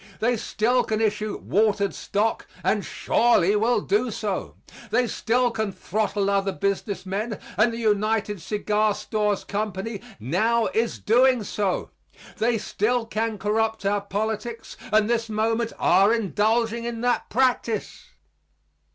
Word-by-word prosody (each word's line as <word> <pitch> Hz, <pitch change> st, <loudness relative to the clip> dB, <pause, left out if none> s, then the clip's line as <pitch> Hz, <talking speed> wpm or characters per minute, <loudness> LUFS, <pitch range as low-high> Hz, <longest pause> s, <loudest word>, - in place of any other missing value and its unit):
They 240 Hz, +2 st, +2 dB
still 235 Hz, +3 st, +1 dB
can 215 Hz, -1 st, -1 dB
issue 215 Hz, -1 st, -1 dB
watered 205 Hz, -1 st, +1 dB
stock 215 Hz, +3 st, -1 dB, 0.2 s
and -, -, +1 dB
surely 210 Hz, -5 st, +2 dB
will 220 Hz, +1 st, +2 dB
do 215 Hz, +6 st, +1 dB
so. 205 Hz, -3 st, -3 dB, 0.3 s
They 250 Hz, -, +2 dB
still 240 Hz, +2 st, +1 dB
can 220 Hz, -3 st, -2 dB
throttle 205 Hz, +1 st, -1 dB
other 200 Hz, 0 st, +1 dB
business 200 Hz, 0 st, -2 dB
men 205 Hz, +3 st, -3 dB, 0.2 s
and 215 Hz, +5 st, +3 dB
the 230 Hz, -, -5 dB
United 215 Hz, -2 st, 0 dB
Cigar 210 Hz, +2 st, 0 dB
Stores 210 Hz, -2 st, -1 dB
Company 205 Hz, 0 st, -3 dB, 0.2 s
now 220 Hz, -, +1 dB
is 230 Hz, +1 st, 0 dB
doing 250 Hz, +1 st, +3 dB
so. 200 Hz, -2 st, -2 dB, 0.5 s
They 230 Hz, +1 st, +2 dB
still 225 Hz, +3 st, 0 dB
can 225 Hz, 0 st, -2 dB
corrupt 220 Hz, +1 st, -1 dB
our 200 Hz, +1 st, +1 dB
politics 220 Hz, +3 st, -4 dB, 0.2 s
and 215 Hz, 0 st, +4 dB
this 230 Hz, -1 st, 0 dB
moment 225 Hz, +2 st, 0 dB
are 200 Hz, +3 st, +4 dB
indulging 225 Hz, +1 st, +1 dB
in 235 Hz, -1 st, -4 dB
that 245 Hz, 0 st, 0 dB
practice. 245 Hz, -2 st, 0 dB
215 Hz, 135 wpm, -24 LUFS, 205-230 Hz, 0.5 s, and